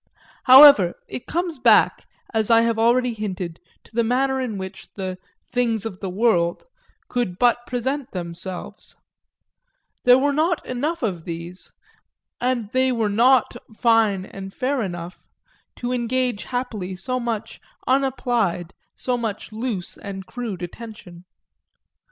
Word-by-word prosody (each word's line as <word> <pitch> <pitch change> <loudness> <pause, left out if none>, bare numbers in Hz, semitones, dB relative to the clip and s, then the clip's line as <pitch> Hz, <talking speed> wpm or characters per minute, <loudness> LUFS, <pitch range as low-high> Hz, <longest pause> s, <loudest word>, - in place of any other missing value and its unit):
However, 260 -9 +9
it 250 - -7
comes 340 -3 -2
back, - - +4 0.3
as 220 -1 +1
I 230 -1 +6
have 230 -1 +1
already 240 +2 +3
hinted, 185 -6 -5 0.2
to - - -22
the 235 +1 +2
manner 265 +3 +1
in 230 -5 -3
which 190 0 -8
the 185 -2 -5 0.3
"things 230 -4 0
of 195 -4 -6
the 195 - -4
world" 180 -4 +1 0.4
could 240 -8 -2
but 240 +1 +2
present 260 +2 -2
themselves; 175 +1 -7 1.1
there 250 0 +7
were 285 +2 +1
not 320 +3 +1
enough 290 +6 -2
of 180 -7 -2
these, 170 +2 -7 0.7
and 240 -4 -1
they 260 0 +2
were 225 -4 0
not 240 +4 +4 0.2
fine 220 -5 +3
and 195 0 -8
fair 265 +4 -1
enough, 175 -3 -6 0.5
to 245 +1 -3
engage 245 -2 -1
happily 215 -7 -4
so 255 +8 -3
much 225 -2 -4 0.2
unapplied, 245 -9 0 0.2
so 250 -1 -1
much 220 -3 -4
loose 215 -5 -4
and 195 -2 -7
crude 215 -7 -5
attention. 180 -2 -10
230 Hz, 135 wpm, -22 LUFS, 190-250 Hz, 1.1 s, However